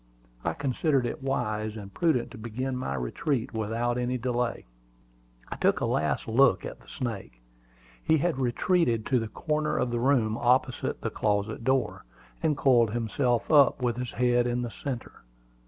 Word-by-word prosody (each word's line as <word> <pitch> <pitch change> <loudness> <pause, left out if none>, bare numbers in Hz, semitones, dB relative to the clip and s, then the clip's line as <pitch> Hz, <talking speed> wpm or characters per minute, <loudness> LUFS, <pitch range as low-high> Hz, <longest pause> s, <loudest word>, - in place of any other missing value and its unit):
I - - 0
considered 140 0 0
it 120 - -4
wise 110 -5 -2
and 100 -2 -9
prudent 140 - +1
to 130 - -10
begin 125 +4 -3
my 125 - -3
retreat 115 - -2
without 115 +3 -1
any 125 +1 -1
delay. 125 0 -2 0.8
I - - -5
took - - +2
a - - 0
last - - 0
look 125 +4 +4
at - - -7
the - - -21
snake. 100 - -5 0.6
He 160 - +3
had 160 -2 0
retreated 125 -1 +1
to 130 -2 +2
the 110 - -3
corner 150 +7 -1
of 125 - 0
the 120 - -1
room 120 -4 +2
opposite 125 +1 +1
the - - -2
closet 105 +2 -1
door 130 +1 0 0.4
and 155 -3 +1
coiled 120 -5 +4
himself 120 +2 0
up, 140 -3 +5
with 120 -1 0
his 125 -1 -4
head 120 0 +2
in 120 0 -1
the 120 - -4
centre. 130 -2 -6
120 Hz, 170 wpm, -28 LUFS, 115-135 Hz, 0.8 s, up